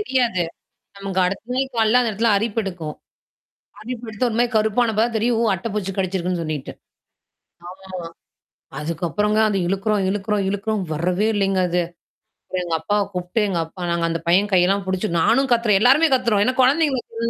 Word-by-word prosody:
தெரியாது. 245 Hz, -, +1 dB, 0.6 s
நமக்கு 195 Hz, -1 st, -3 dB
அடுத்த 195 Hz, +7 st, -4 dB
நாள் 265 Hz, +1 st, -1 dB
காலையில 225 Hz, +2 st, +4 dB
அந்த 235 Hz, -3 st, 0 dB
இடத்துல 225 Hz, +2 st, +1 dB
அரிப்பு 225 Hz, +2 st, -1 dB
எடுக்கும். 170 Hz, -6 st, -5 dB, 0.9 s
அரிப்பு 245 Hz, +1 st, -6 dB
எடுத்து 220 Hz, +3 st, -1 dB
ஒருமாரி 235 Hz, +2 st, +1 dB
கருப்பான 220 Hz, +2 st, +2 dB
அப்பதா 220 Hz, +2 st, +2 dB
தெரியும் 235 Hz, +1 st, +1 dB
ஓ! -, -, +2 dB
அட்ட 190 Hz, +6 st, -5 dB
பூச்சி 200 Hz, -2 st, -2 dB
கடிச்சிருக்குன்னு 185 Hz, -2 st, -1 dB
சொல்லிட்டு. 155 Hz, -3 st, -5 dB, 1.0 s
ஆமாமா. 185 Hz, -2 st, -8 dB, 0.7 s
அதுக்கப்புறங்க 175 Hz, +7 st, -1 dB
அது 200 Hz, -2 st, 0 dB
இழுக்குறோம், 200 Hz, +2 st, 0 dB
இழுக்குறோம், 205 Hz, 0 st, -1 dB
இழுக்குறோம் 205 Hz, +1 st, -2 dB
வரவே 180 Hz, +6 st, 0 dB
இல்லைங்க 195 Hz, -2 st, +1 dB
அது. 175 Hz, 0 st, +1 dB, 0.6 s
அப்புறம் 185 Hz, -1 st, -3 dB
எங்க 170 Hz, -1 st, -2 dB
அப்பாவ 205 Hz, +5 st, 0 dB
கூப்புட்டு 180 Hz, +4 st, -2 dB
எங்க 180 Hz, -, -1 dB
அப்பா 180 Hz, +3 st, -11 dB
நாங்க 170 Hz, 0 st, 0 dB
அந்த 165 Hz, 0 st, -2 dB
பையன் 195 Hz, +4 st, +3 dB
கையெல்லாம் 190 Hz, +2 st, +3 dB
புடிச்சு. 190 Hz, +3 st, -1 dB
நானும் 265 Hz, +7 st, +3 dB
கத்துறேன். 230 Hz, -4 st, +3 dB
எல்லாருமே 270 Hz, +8 st, +5 dB
கத்துரோம். 235 Hz, -5 st, +2 dB
ஏன்னா 255 Hz, +3 st, +1 dB
குழந்தைங்கு 285 Hz, +2 st, +3 dB
ஒண்ணுன்னா 230 Hz, -, -19 dB
205 Hz, 165 wpm, -21 LUFS, 185-230 Hz, 1.0 s, எல்லாருமே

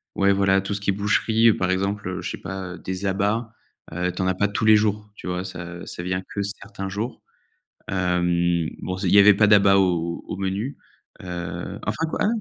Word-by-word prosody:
ouais 100 Hz, 0 st, +3 dB
voilà, 95 Hz, 0 st, +3 dB
tout 95 Hz, +1 st, -3 dB
ce 100 Hz, -, -4 dB
qui 100 Hz, -, +1 dB
est -, -, -1 dB
boucherie 110 Hz, +2 st, +3 dB
par 95 Hz, 0 st, 0 dB
exemple, 100 Hz, +1 st, -1 dB
heu, 90 Hz, -1 st, -4 dB
je -, -, -4 dB
sais -, -, -5 dB
pas, 95 Hz, -2 st, -6 dB
heu, -, -, -12 dB
des 95 Hz, +2 st, -5 dB
abats, 105 Hz, +4 st, 0 dB, 0.4 s
heu, 90 Hz, +2 st, -1 dB
tu 95 Hz, -, -5 dB
en 95 Hz, -, +1 dB
as 95 Hz, -, +1 dB
pas 100 Hz, +2 st, +2 dB
tous 105 Hz, +2 st, -2 dB
les 110 Hz, 0 st, +8 dB
jours 105 Hz, 0 st, -1 dB
tu -, -, -12 dB
vois? 90 Hz, 0 st, -2 dB
Ça 85 Hz, -2 st, -7 dB
ça 90 Hz, -, -6 dB
vient 95 Hz, +1 st, -1 dB
que 100 Hz, -, 0 dB
certains 100 Hz, -1 st, -6 dB
jours. 110 Hz, +6 st, -4 dB, 0.7 s
Hem, 85 Hz, -2 st, +1 dB
bon 95 Hz, 0 st, -3 dB
c 95 Hz, 0 st, -2 dB
il -, -, +2 dB
y 100 Hz, -, +8 dB
avait 105 Hz, +1 st, +8 dB
pas 105 Hz, -, +5 dB
d'abat 100 Hz, -2 st, +6 dB
au 85 Hz, -3 st, 0 dB
au -, -, -5 dB
menu. 100 Hz, +8 st, -2 dB, 0.5 s
Heu, 90 Hz, -1 st, -5 dB
enfin 160 Hz, -, -1 dB
quoi -, -, -4 dB
ah -, -, +3 dB
95 Hz, 225 wpm, -23 LUFS, 90-100 Hz, 0.7 s, les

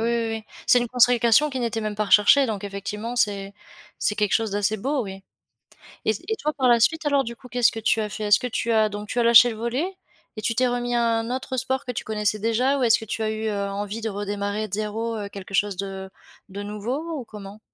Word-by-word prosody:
oui, 235 Hz, -1 st, 0 dB
oui! 220 Hz, -, -9 dB, 0.2 s
C'est 250 Hz, -, +6 dB
une 240 Hz, -, -1 dB
consécration 245 Hz, +3 st, +4 dB
qui 265 Hz, -, -4 dB
n'était 235 Hz, -2 st, -2 dB
même 215 Hz, -1 st, -3 dB
pas 215 Hz, -, 0 dB
recherchée 210 Hz, +7 st, +5 dB
donc 210 Hz, -3 st, -3 dB
effectivement, 210 Hz, +4 st, -5 dB
c'est 200 Hz, -3 st, 0 dB, 0.5 s
c'est 210 Hz, -, 0 dB
quelque 210 Hz, -1 st, 0 dB
chose 225 Hz, -2 st, +1 dB
d'assez 205 Hz, +1 st, 0 dB
beau, 270 Hz, +5 st, -1 dB
oui 195 Hz, -1 st, -8 dB, 0.8 s
et 220 Hz, -, +3 dB
c 205 Hz, -, -9 dB
et 440 Hz, -, +1 dB
toi, 305 Hz, +1 st, -2 dB
par 255 Hz, -2 st, +3 dB
la 235 Hz, -1 st, +5 dB
suite, 320 Hz, +7 st, +2 dB
alors, 280 Hz, -2 st, +3 dB
du 235 Hz, +1 st, -6 dB
coup, 250 Hz, -, -14 dB
qu'est-ce 245 Hz, -2 st, +3 dB
que 225 Hz, -, -6 dB
tu 220 Hz, 0 st, +2 dB
as 210 Hz, -, -3 dB
fait? 210 Hz, +2 st, -5 dB
Est-ce 205 Hz, 0 st, +5 dB
que 250 Hz, -, -3 dB
tu 235 Hz, 0 st, -2 dB
as 220 Hz, -1 st, +4 dB
donc 205 Hz, 0 st, -7 dB
tu 245 Hz, -, -1 dB
as 235 Hz, -, +3 dB
lâché 235 Hz, +1 st, +8 dB
le 225 Hz, -, -5 dB
volley 240 Hz, +8 st, -1 dB, 0.5 s
et -, -, -4 dB
tu 230 Hz, -, -1 dB
t'es 255 Hz, +2 st, +3 dB
remis 245 Hz, 0 st, -1 dB
à 235 Hz, -, +2 dB, 0.2 s
un 225 Hz, +1 st, -4 dB
autre 260 Hz, 0 st, -4 dB
sport 260 Hz, +1 st, -1 dB
que 250 Hz, -, -3 dB
tu -, -, -5 dB
connaissais 210 Hz, -1 st, -1 dB
déjà? 250 Hz, +6 st, +1 dB
Ou -, -, 0 dB
est-ce 230 Hz, -1 st, +5 dB
que 220 Hz, -, -8 dB
tu 220 Hz, -, -4 dB
as 215 Hz, -, 0 dB
eu, 220 Hz, 0 st, -3 dB
heu, 200 Hz, -2 st, -1 dB
envie 205 Hz, +2 st, -4 dB
de 220 Hz, -, -2 dB
redémarrer 205 Hz, +1 st, -3 dB
de 190 Hz, -, -14 dB
zéro, 220 Hz, +2 st, -2 dB
heu, 205 Hz, -1 st, -4 dB
quelque 195 Hz, -1 st, -10 dB
chose 205 Hz, +1 st, +1 dB
de 195 Hz, -1 st, -5 dB, 0.4 s
de 200 Hz, +2 st, -6 dB
nouveau 255 Hz, +11 st, -4 dB
ou 250 Hz, -, -7 dB
comment? 205 Hz, -1 st, -10 dB
220 Hz, 255 wpm, -24 LUFS, 205-245 Hz, 0.8 s, lâché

